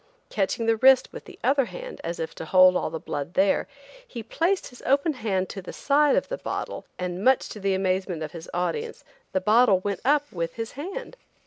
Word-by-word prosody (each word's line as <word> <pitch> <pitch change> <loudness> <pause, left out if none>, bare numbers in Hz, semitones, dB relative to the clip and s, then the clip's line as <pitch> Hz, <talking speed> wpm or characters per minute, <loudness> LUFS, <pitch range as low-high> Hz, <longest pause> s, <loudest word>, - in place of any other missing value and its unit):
Catching 210 +3 -1
the 225 0 +2
wrist 260 +2 +5
with - - -9
the 390 -4 -13
other 270 +1 +3
hand, - - -9
as 170 - -4
if 160 - -4
to - - -7
hold 185 +2 +6
all - - 0
the 160 - -5
blood 145 +3 -5
there, 195 +1 +2 0.4
he 235 -3 -7
placed 345 - 0
his 245 - -15
open 280 +4 +2
hand 200 -7 -1
to 195 - -6
the 185 - -8
side 290 0 +3
of - - 0
[the] - - -5
bottle - - -5
and, 180 +1 -4
much 260 +1 +4
to 215 - -8
the 195 -1 +1
amazement 185 -3 -1
of 155 - -6
his 165 -1 -9
audience, 450 - -3 0.3
the 190 - 0
bottle 215 +1 +5
went 200 -1 -2
up 290 +2 +2
with 165 -2 -4
his 225 0 -5
hand. 395 - -7
220 Hz, 215 wpm, -25 LUFS, 185-280 Hz, 0.4 s, hold